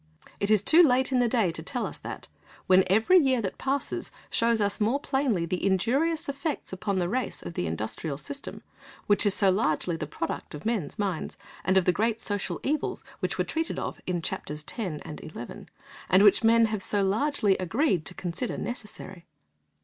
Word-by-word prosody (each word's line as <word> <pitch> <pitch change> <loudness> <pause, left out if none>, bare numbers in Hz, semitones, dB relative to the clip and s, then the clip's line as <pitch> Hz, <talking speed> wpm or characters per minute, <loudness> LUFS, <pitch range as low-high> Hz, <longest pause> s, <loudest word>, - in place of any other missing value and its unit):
It 200 - 0
is 215 -2 +4
too 325 +10 +7
late 260 -4 +4
in 255 - +3
the 245 - +3
day 220 -7 +2
to 165 - -6
tell 245 - -2
us - - -6
that, - - -7 0.4
when 185 0 +6
every 220 - +5
year 265 -5 +3
that 200 -4 -4
passes 275 +1 -2 0.2
shows 230 -1 +3
us 205 +1 0
more 230 +7 +2
plainly 265 -12 0
the 180 +2 -3
injurious 275 - +1
effects 280 - -3
upon 195 +1 -2
the 175 -2 +1
race 250 +7 -2
of - - -6
the 90 - -2
industrial 110 - -3
system, 280 - -6 0.4
which 205 +1 +3
is 200 - +3
so 195 -3 +4
largely 170 -2 +1
the 155 -2 -4
product 150 - -4
of 150 - -10
men's 220 -9 -1
minds, 195 -5 -2 0.3
and 190 +2 +3
of 185 - +4
the 180 - +5
great 225 +3 0
social 205 -3 -2
evils 300 +3 -1 0.2
which - - -2
were - - +2
treated 325 0 -3
of - - -4
in 175 -2 -1
Chapters 150 -1 -5
X. 180 -11 -4
and 150 - -7
XI., 120 -6 -8 0.4
and 185 +3 +6
which 205 +2 +6
men 230 0 +6
have 215 -2 -2
so 200 +1 +1
largely 210 0 +2
agreed 185 - +1
to - - -4
consider 180 +8 -3
"necessary." 210 -6 -6
205 Hz, 195 wpm, -27 LUFS, 180-250 Hz, 0.4 s, too